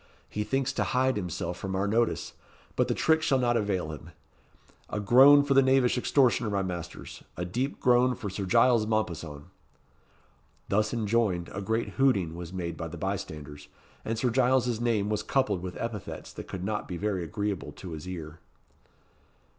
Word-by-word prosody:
He 105 - -3
thinks 135 +4 -1
to - - 0
hide 130 +1 +1
himself 90 -2 -4
from 95 -1 -4
our 100 +2 0
notice; 115 +3 0 0.4
but - - +2
the - - 0
trick 160 0 +3
shall 140 -3 +2
not 120 -2 +2
avail 100 -7 -1
him. 75 - -9 0.8
A 105 - -3
groan 135 +7 +7
for 140 -1 +1
the 135 - +6
knavish 130 -2 +3
extortioner, 125 -2 +2
my 100 -1 0
masters 90 -3 -6 0.2
a 90 - -2
deep 125 +10 -2
groan 125 0 +4
for 105 - -6
Sir 95 0 -4
Giles 115 +1 +4
Mompesson!" 85 -9 -3 1.2
Thus 105 +2 +1
enjoined, 105 -6 0
a 100 - -4
great 110 +3 -1
hooting 100 -12 +3
was 85 0 -7
made 85 -3 -4
by 80 - -4
the 85 +2 -8
bystanders, 75 -6 -5 0.4
and 115 0 -2
Sir 125 +1 +1
Giles's 125 -2 +2
name 115 -4 +1
was 105 0 -1
coupled 105 -8 0
with 90 -1 -6
epithets 115 -4 -6
that - - -8
could 90 - -6
not 105 +1 -2
be 90 - -5
very 95 -2 -1
agreeable 100 +1 -3
to 90 - -9
his 80 +2 -7
ear. 85 -3 -7
105 Hz, 175 wpm, -28 LUFS, 90-120 Hz, 1.2 s, groan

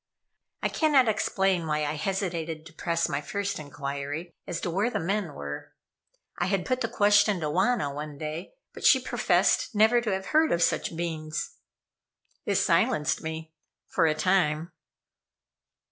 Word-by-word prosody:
I - - +3
cannot 290 -6 +3
explain 190 -5 +1
why 150 0 0
I 145 - -1
hesitated 165 -3 -3
to 165 - -13
press 170 +1 0
my 140 - -2
first 200 +4 -3
inquiry 145 +3 -5
as 170 - -3
to 175 - -2
where 200 +7 +1
the - - -2
men 200 +5 -2
were. - - -7 0.7
I 175 - +1
had 190 -2 0
put 255 0 -1
the 230 - +1
question 205 -3 +4
to 155 -2 -2
Wauna 185 -4 +1
one 150 0 -6
day, 155 - -6 0.2
but - - -10
she - - +7
professed 235 - +1
never 220 +3 +5
to 225 -3 -2
have 190 0 -2
heard 315 +1 +4
of 170 - +2
such 165 - 0
beings. 160 -2 -4 0.9
It - - +1
silenced 150 -1 +2
me 160 0 -6 0.3
for 165 - +2
a 155 - +2
time. 170 -2 +1
170 Hz, 160 wpm, -27 LUFS, 155-205 Hz, 0.9 s, she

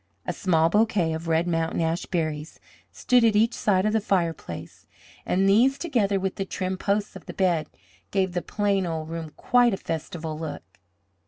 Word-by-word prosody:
A - - -2
small 165 -4 +2
bouquet 200 -3 +2
of 160 +1 -5
red 165 +1 +2
mountain 165 -1 -1
ash 165 +1 -1
berries 155 -3 -3 0.3
stood 250 -1 +2
at 225 -2 +4
each 225 +3 +3
side 190 -2 +1
of 215 - +1
the 220 - +2
fireplace, 165 - -3 0.4
and 190 +2 +2
these, 245 +7 +4
together 230 - 0
with 190 0 -3
the 195 - -1
trimmed 185 0 -3
posts 205 +1 -1
of - - -11
the - - -7
bed, 175 -5 +1 0.4
gave 190 -2 0
the 175 - -1
plain 200 -2 0
old 160 -1 -4
room 165 -2 -5
quite 245 -3 +3
a - - -8
festival 160 -1 -5
look. 160 -2 -5
185 Hz, 180 wpm, -25 LUFS, 165-205 Hz, 0.4 s, at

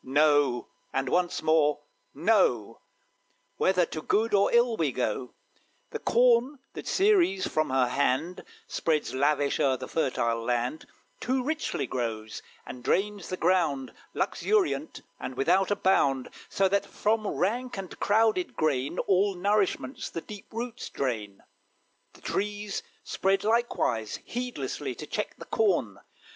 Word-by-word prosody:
No; 145 -2 +3 0.2
and 135 -1 -1
once 175 +1 0
more, 155 -2 +3 0.3
No! 185 - +2 0.8
Whether 185 -2 +3
to 155 - -6
good 220 +7 +1
or 200 0 +4
ill 235 -1 +4
we 160 -8 0
go. 125 0 -3 0.6
The 450 - -4
corn 245 - +3 0.2
that - - -8
Ceres 370 - +3
from 155 - 0
her 130 -1 +3
hand 140 +7 0 0.2
Spreads 155 -2 -1
lavish 145 +1 +1
o'er 130 -2 +2
the 130 - -7
fertile 115 -7 0
land, 125 +5 -2 0.3
Too 255 +1 0
richly 310 +3 -2
grows, 110 -4 -4 0.2
and 125 - -9
drains 200 +6 0
the 185 - -3
ground, 165 -8 +1 0.2
Luxuriant, 375 -7 0 0.2
and 130 - -6
without 180 +8 +3
a 205 - +2
bound; 140 -10 +2 0.2
So 195 - +2
that 200 +1 0
from 215 0 0
rank 240 +6 -1
and 190 -2 -7
crowded 215 -3 +2
grain 145 0 0
All 195 +1 +2
nourishment 190 -8 0
the 165 - -3
deep 210 +2 -10
roots 235 +1 -5
drain; 110 -7 -3 0.7
The - - -18
trees 205 0 -3 0.2
spread 195 +1 0
likewise 215 - 0
heedlessly 245 +1 -4
To - - -7
check - - -3
the - - -10
corn. 440 -2 0
180 Hz, 135 wpm, -28 LUFS, 135-215 Hz, 0.8 s, or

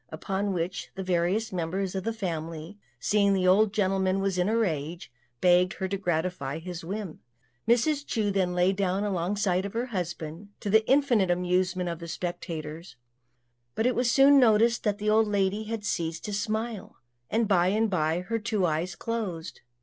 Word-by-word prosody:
upon 195 +5 -2
which 180 +1 -3
the 190 - -4
various 185 +4 0
members 185 +2 -2
of 190 -1 -3
the 225 - -1
family, 165 -4 -5 0.2
seeing 200 -1 +2
the 185 -1 +1
old 200 +3 +5
gentleman 190 -2 +1
was 195 -2 0
in 180 +3 +2
a 225 - +2
rage, 165 - -2 0.3
begged 180 +1 +4
her 190 - -3
to 195 - -2
gratify 175 -6 -2
his 170 0 -7
whim. 195 -1 -5 0.5
Mrs. 275 +5 +2
Chu 215 -7 -1
then 185 -2 0
lay 180 +2 +3
down 195 0 0
alongside 190 0 0
of 200 - -5
her 235 +2 -1
husband, 175 -4 -5
to 205 - -3
the 220 +1 +5
infinite 250 -8 +3
amusement 180 +1 +1
of 170 -1 -4
the 170 - -8
spectators; 170 -1 -5 0.8
but 220 - 0
it 250 - +3
was 245 0 +1
soon 275 +3 +6
noticed 230 -1 +4
that 205 -1 0
the 210 0 -4
old 220 0 +4
lady 205 +1 0
had 220 -1 -4
ceased 165 -4 -2
to 210 - -4
smile, 215 +1 -3 0.3
and 225 0 +1
by 180 -3 +3
and 215 +4 +2
by 160 -1 +1
her 230 +5 -2
two 210 -3 0
eyes 170 +2 -1
closed. 190 -7 -4
190 Hz, 180 wpm, -27 LUFS, 175-215 Hz, 0.8 s, soon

